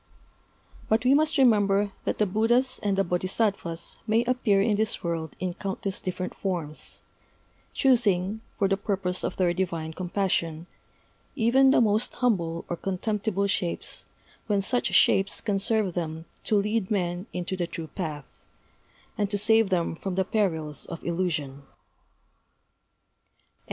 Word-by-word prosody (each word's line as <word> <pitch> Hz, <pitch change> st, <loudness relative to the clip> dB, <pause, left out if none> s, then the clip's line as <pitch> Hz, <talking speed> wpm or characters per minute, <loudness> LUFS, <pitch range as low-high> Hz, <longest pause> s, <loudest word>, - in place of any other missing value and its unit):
But 220 Hz, +3 st, +2 dB
we 260 Hz, -, +6 dB
must 310 Hz, +2 st, +3 dB
remember 205 Hz, -5 st, +4 dB
that -, -, -1 dB
the 210 Hz, -, +3 dB
Buddhas 230 Hz, +6 st, +1 dB
and 200 Hz, -2 st, 0 dB
the 195 Hz, -, +3 dB
Bodhisattvas 180 Hz, -1 st, -1 dB
may 220 Hz, +2 st, +3 dB
appear 240 Hz, -5 st, +2 dB
in 210 Hz, +1 st, +2 dB
this 220 Hz, +2 st, 0 dB
world 165 Hz, -3 st, -3 dB
in 185 Hz, -1 st, -2 dB
countless 195 Hz, 0 st, -4 dB
different 185 Hz, 0 st, -4 dB
forms; 170 Hz, -6 st, -3 dB, 0.7 s
choosing, 215 Hz, -5 st, +3 dB, 0.2 s
for 200 Hz, -, +2 dB
the 195 Hz, 0 st, +1 dB
purpose 195 Hz, -2 st, -1 dB
of -, -, -3 dB
their 180 Hz, -2 st, +2 dB
divine 170 Hz, -3 st, -2 dB
compassion, 175 Hz, -3 st, -1 dB, 0.7 s
even 265 Hz, +2 st, +4 dB
the 265 Hz, -, +5 dB
most 215 Hz, 0 st, +1 dB
humble 170 Hz, -9 st, 0 dB
or 175 Hz, -, -3 dB
contemptible 200 Hz, +2 st, -1 dB
shapes 185 Hz, -3 st, -2 dB, 0.4 s
when 205 Hz, -2 st, +2 dB
such 245 Hz, +5 st, +1 dB
shapes 195 Hz, +1 st, +3 dB
can 200 Hz, -3 st, -1 dB
serve 210 Hz, -2 st, +1 dB
them 160 Hz, -2 st, -4 dB, 0.2 s
to 215 Hz, -, +2 dB
lead 210 Hz, 0 st, +1 dB
men 180 Hz, -1 st, -1 dB
into 180 Hz, +1 st, -3 dB
the 175 Hz, -2 st, -2 dB
true 165 Hz, -1 st, -6 dB
path, 155 Hz, -3 st, -5 dB, 0.9 s
and 205 Hz, -1 st, +1 dB
to 205 Hz, -, -1 dB
save 220 Hz, 0 st, +4 dB
them 175 Hz, -3 st, 0 dB
from 185 Hz, +2 st, -4 dB
the 190 Hz, 0 st, +1 dB
perils 160 Hz, -, -1 dB
of 170 Hz, -, -7 dB
illusion. 160 Hz, -6 st, -2 dB
195 Hz, 140 wpm, -26 LUFS, 175-215 Hz, 0.9 s, we